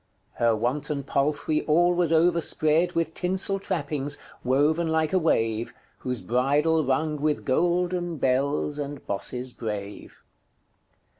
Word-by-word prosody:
Her 115 -1 +3
wanton 140 +6 -2
palfrey 145 +3 0
all 175 +3 +4
was 175 -2 0
overspred 165 0 +2
With 165 -1 -1
tinsell 190 +3 +2
trappings, 145 -5 -1 0.3
woven 150 +6 +2
like 160 +1 0
a 185 - +4
wave, 115 -8 0 0.2
Whose 125 -2 -4
bridle 145 +6 +2
rung 150 +2 -1
with 150 0 -1
golden 175 +3 0
bels 140 +3 0
and 145 -1 -6
bosses 125 +5 -4
brave." 105 -3 -7
150 Hz, 120 wpm, -25 LUFS, 130-165 Hz, 0.3 s, all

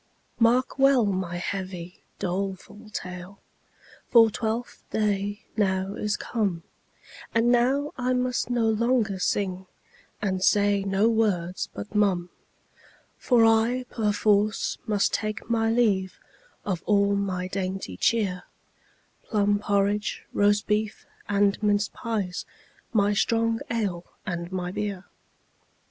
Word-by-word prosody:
Mark 245 +4 +3
well 270 -4 +5
my 185 -3 -2
heavy, 180 -1 -5 0.2
doleful 195 +3 -4
tale, 180 -1 -7 0.7
For 225 -2 +6
Twelfth 225 +2 -3
day 205 -1 -1
now 190 -2 0
is 210 0 -1
come, 195 -8 -2 0.7
And 230 +1 +4
now 265 +4 +2
I 255 0 0
must 250 -1 0
no 240 -2 +1
longer 220 -2 +1
sing, 185 -1 -1 0.5
And 190 -3 -1
say 205 0 +3
no 195 +2 +2
words 200 -6 0
but 205 - -8
mum; 190 -4 +1 0.9
For 240 -3 +4
I 225 +3 +3
perforce 210 -1 +1
must 205 -2 +1
take 215 0 -3
my 225 -1 +2
leave 205 -5 +1 0.5
Of 185 -4 -2
all 200 -1 +3
my 185 -2 -2
dainty 185 - -4
cheer, 190 - 0 0.8
Plum 205 -2 +1
porridge, 205 0 0
roast 205 0 +3
beef, 210 0 -1 0.2
and 200 0 +2
minced 205 -1 +1
pies, 205 -6 -3 0.5
My 205 -2 +3
strong 230 +2 +1
ale 200 -7 -1 0.2
and 175 -2 -4
my 180 -1 -3
beer. 200 -1 -4
205 Hz, 115 wpm, -26 LUFS, 190-225 Hz, 0.9 s, For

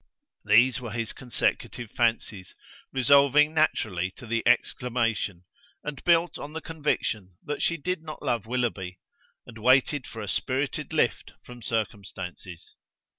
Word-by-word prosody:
These 120 +4 +5
were 120 - -5
his 115 0 -2
consecutive 120 -2 -2
fancies, 115 -5 -1 0.4
resolving 140 +3 +5
naturally 105 - +1
to - - -10
the 115 0 0
exclamation, 115 -6 +1 0.4
and 145 -2 -6
built 170 0 +3
on 150 - -7
the 160 - -3
conviction 125 - -2
that 150 - -4
she 170 - +2
did 180 +2 -2
not 155 -2 -9
love 120 -6 -1
Willoughby, 110 -7 -2 0.5
and 115 -2 -11
waited 130 +3 +3
for 110 -2 -7
a - - -6
spirited 135 +8 -1
lift 155 -6 0
from 125 -1 -12
circumstances. 95 -6 -5
120 Hz, 130 wpm, -27 LUFS, 110-145 Hz, 0.5 s, These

